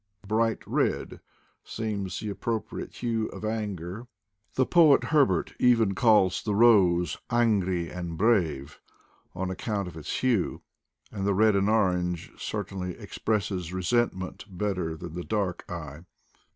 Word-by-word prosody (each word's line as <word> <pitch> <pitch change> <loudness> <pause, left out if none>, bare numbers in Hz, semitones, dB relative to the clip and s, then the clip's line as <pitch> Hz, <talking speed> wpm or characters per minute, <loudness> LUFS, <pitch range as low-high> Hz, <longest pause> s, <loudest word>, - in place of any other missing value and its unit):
Bright 110 +2 +1
red - - -1 0.4
seems 100 -5 -4
the. 105 -2 -3
appropriate 115 +2 -4
hue 115 -2 0
of - - -7
anger 105 -1 -4 0.2
— 100 +2 -41
the 130 - +3
poet 160 -3 +5
Herbert 150 -3 +2
even 115 -5 +4
calls 95 -4 +4
the 105 -2 -1
rose 95 -7 +4
"angrie 100 -7 +1
and 85 -2 -5
brave" 85 - +1 0.6
on 95 0 -2
account 100 +1 -3
of 85 - -9
its 80 - -4
hue 120 -8 0 0.2
— - - -37
and 100 -2 -4
the 100 0 +1
red 110 +1 +4
or 100 +1 +2
orange 90 -5 +1
certainly 95 -3 -4
expresses 100 -5 -2
resentment 95 0 -1
better 90 -4 -2
than 85 -1 -8
the 90 +1 -5
dark 100 -4 -2
eye. 75 -4 -6
100 Hz, 140 wpm, -27 LUFS, 90-110 Hz, 0.6 s, poet